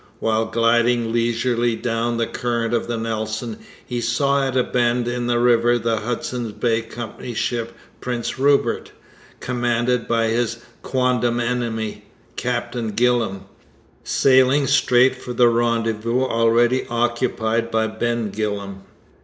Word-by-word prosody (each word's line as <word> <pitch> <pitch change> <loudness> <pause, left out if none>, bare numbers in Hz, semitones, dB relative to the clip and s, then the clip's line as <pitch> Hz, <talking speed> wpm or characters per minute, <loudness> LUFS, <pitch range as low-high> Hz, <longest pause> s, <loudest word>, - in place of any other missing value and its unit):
While 110 0 0
gliding 115 0 +2
leisurely 120 0 +1
down 115 0 -1
the 115 - +1
current 115 0 -2
of 115 - 0
the 120 -1 -2
Nelson, 110 0 -3 0.3
he 120 -1 -3
saw 140 +4 +1
at 130 0 -2
a 125 - +4
bend 120 -1 0
in 120 0 -2
the 120 0 +1
river 120 0 +3
the 115 -1 0
Hudson's 120 0 -3
Bay 115 0 0
Company's 115 0 -7
ship 115 -1 -2 0.3
Prince 125 0 -4
Rupert, 140 +1 +1 0.5
commanded 120 0 0
by 115 -1 +1
his 115 0 0 0.2
quondam 125 -2 0
enemy, 115 -2 -2 0.3
Captain 120 -2 -3
Gillam, 115 -4 +1 0.6
sailing 130 +1 +4
straight 130 -2 +3
for 125 - -6
the 120 0 +5
rendezvous 115 +1 0
already 120 +1 +2
occupied 120 -1 0
by 110 -1 +1
Ben 110 0 -2
Gillam. 100 -2 -4
120 Hz, 130 wpm, -21 LUFS, 115-125 Hz, 0.6 s, the